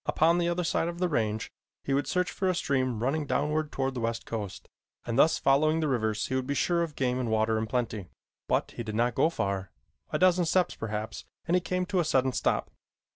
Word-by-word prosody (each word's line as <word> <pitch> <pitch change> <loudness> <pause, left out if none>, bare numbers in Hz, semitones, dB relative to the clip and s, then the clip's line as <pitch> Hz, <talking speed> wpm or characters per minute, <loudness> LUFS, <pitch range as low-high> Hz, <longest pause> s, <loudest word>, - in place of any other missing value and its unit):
Upon 165 +2 +3
the 170 0 +1
other 175 +1 0
side 165 0 0
of 170 0 -4
the 180 +1 +1
range 110 -8 -1 0.3
he 135 - -1
would 140 +1 +1
search 180 -1 0
for 190 - -1
a 185 - +1
stream 130 -7 0
running 145 +3 0
downward 150 +2 0
toward 135 0 -1
the 125 - -4
west 115 0 -2
coast, 105 -4 -5 0.4
and 115 - -2
thus 155 +5 +5
following 155 +4 +3
the 155 - 0
rivers 110 -5 0
he - - -4
would 130 -1 -1
be 140 - -1
sure 170 +4 +2
of 165 -3 -3
game 125 -1 0
and 125 -3 -1
water 110 0 +2
in 110 - -2
plenty. 115 -5 -2 0.4
But - - 0
he - - -6
did 110 -2 -5
not 120 +2 +2
go 155 - +3
far. 100 - -2 0.4
A - - +1
dozen 180 -1 +4
steps, 180 +2 +2
perhaps, 110 0 -5 0.2
and 170 - -1
he 180 - +4
came 180 +1 -1
to 190 0 0
a - - +3
sudden 130 -4 +2
stop. - - 0
135 Hz, 235 wpm, -28 LUFS, 115-170 Hz, 0.4 s, thus